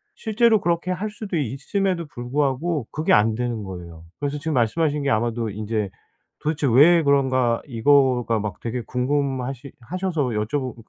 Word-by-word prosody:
실제로 220 Hz, 0 st, +3 dB
그렇게 170 Hz, +1 st, 0 dB
할 200 Hz, +4 st, -2 dB
수도 205 Hz, -4 st, -4 dB
있음에도 170 Hz, -, -1 dB
불구하고 135 Hz, +2 st, -1 dB
그게 155 Hz, +2 st, +1 dB
안 110 Hz, +1 st, +4 dB
되는 120 Hz, -3 st, -2 dB
거예요. 85 Hz, -3 st, -9 dB, 0.2 s
그래서 145 Hz, 0 st, -2 dB
지금 155 Hz, +1 st, -2 dB
말씀하신 145 Hz, +5 st, +1 dB
게 140 Hz, -, 0 dB
아마도 115 Hz, 0 st, 0 dB
인제 105 Hz, 0 st, -3 dB, 0.5 s
'도대체 150 Hz, -2 st, -1 dB
왜 155 Hz, +8 st, +6 dB
그런가.' 130 Hz, -4 st, +2 dB
이거가 125 Hz, -2 st, +3 dB
막 105 Hz, -3 st, -5 dB
되게 120 Hz, +1 st, -3 dB
궁금하시 130 Hz, 0 st, -2 dB
하셔서 180 Hz, +4 st, -2 dB
여쭤보고 120 Hz, +4 st, -2 dB
135 Hz, 355 characters per minute, -23 LUFS, 115-155 Hz, 0.5 s, 왜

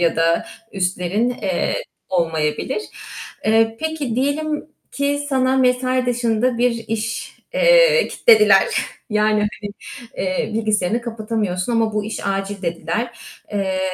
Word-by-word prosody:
ya 170 Hz, -1 st, +2 dB
da 165 Hz, +1 st, +2 dB, 0.3 s
üstlerin, 190 Hz, +4 st, 0 dB
eee, 245 Hz, -, -1 dB, 0.3 s
olmayabilir. 165 Hz, -, -1 dB, 0.6 s
Eee, 225 Hz, +1 st, +3 dB
peki, 315 Hz, -7 st, -2 dB
diyelim 295 Hz, +4 st, -1 dB, 0.3 s
ki 285 Hz, +1 st, 0 dB
sana 260 Hz, -1 st, +2 dB
mesai 255 Hz, 0 st, +2 dB
dışında 240 Hz, 0 st, +1 dB
bir 245 Hz, +1 st, +4 dB, 0.2 s
iş, 225 Hz, +1 st, -3 dB, 0.2 s
eee, -, -, +5 dB
kitlediler. 440 Hz, -3 st, +5 dB, 0.4 s
Yani, 210 Hz, 0 st, +2 dB
hani, 210 Hz, 0 st, -3 dB, 0.8 s
bilgisayarını 215 Hz, -1 st, +1 dB
kapatamıyorsun, 220 Hz, -4 st, -2 dB
"Ama 225 Hz, -1 st, +1 dB
bu 210 Hz, 0 st, -1 dB
iş 215 Hz, -1 st, -5 dB
acil." 195 Hz, 0 st, -2 dB
dediler. 170 Hz, +8 st, -3 dB, 0.3 s
Eee, 190 Hz, -2 st, -1 dB
225 Hz, 110 wpm, -20 LUFS, 200-255 Hz, 0.8 s, eee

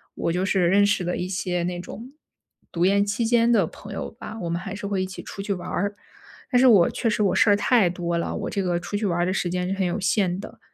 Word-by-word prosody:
我 170 Hz, -, -1 dB
就 180 Hz, +2 st, 0 dB
是 190 Hz, -3 st, +2 dB
认 200 Hz, +3 st, +4 dB
识 200 Hz, -2 st, +1 dB
了 175 Hz, -, -1 dB
一 180 Hz, -, -3 dB
些 180 Hz, -2 st, -2 dB
那 175 Hz, 0 st, -3 dB
种 230 Hz, +8 st, -9 dB, 0.6 s
读 170 Hz, +1 st, +1 dB
研 200 Hz, +1 st, +3 dB
期 210 Hz, +3 st, -1 dB
间 235 Hz, 0 st, +3 dB
的 210 Hz, -7 st, +4 dB
朋 205 Hz, +5 st, -10 dB
友 -, -, -5 dB
吧， 225 Hz, 0 st, -9 dB
我 170 Hz, -, -3 dB
们 170 Hz, -, -1 dB
还 190 Hz, +1 st, -6 dB
是 200 Hz, -, -7 dB
会 200 Hz, -2 st, -1 dB
一 -, -, 0 dB
起 185 Hz, 0 st, -8 dB
出 195 Hz, -, -7 dB
去 200 Hz, 0 st, -2 dB
玩 180 Hz, -, -6 dB
儿。 200 Hz, +2 st, -2 dB, 0.6 s
但 250 Hz, -, +4 dB
是 260 Hz, -, +6 dB
我 200 Hz, -8 st, +6 dB
确 230 Hz, -, -1 dB
实 210 Hz, 0 st, +1 dB
我 195 Hz, -, +2 dB
事 215 Hz, -, +4 dB
儿 205 Hz, -, +6 dB
太 205 Hz, -2 st, +3 dB
多 170 Hz, -1 st, -2 dB
了， 170 Hz, -, -2 dB
我 -, -, -3 dB
这 200 Hz, -, -2 dB
个 175 Hz, -1 st, 0 dB
出 205 Hz, -, -6 dB
去 210 Hz, -, -2 dB
玩 175 Hz, -3 st, 0 dB
儿 175 Hz, -, +2 dB
的 185 Hz, -, 0 dB
时 180 Hz, -2 st, -1 dB
间 180 Hz, 0 st, -2 dB
是 -, -, 0 dB
很 195 Hz, -1 st, -1 dB
有 175 Hz, -, -2 dB
限 185 Hz, -1 st, +1 dB
的。 205 Hz, -, -10 dB
190 Hz, 305 characters per minute, -24 LUFS, 180-205 Hz, 0.6 s, 是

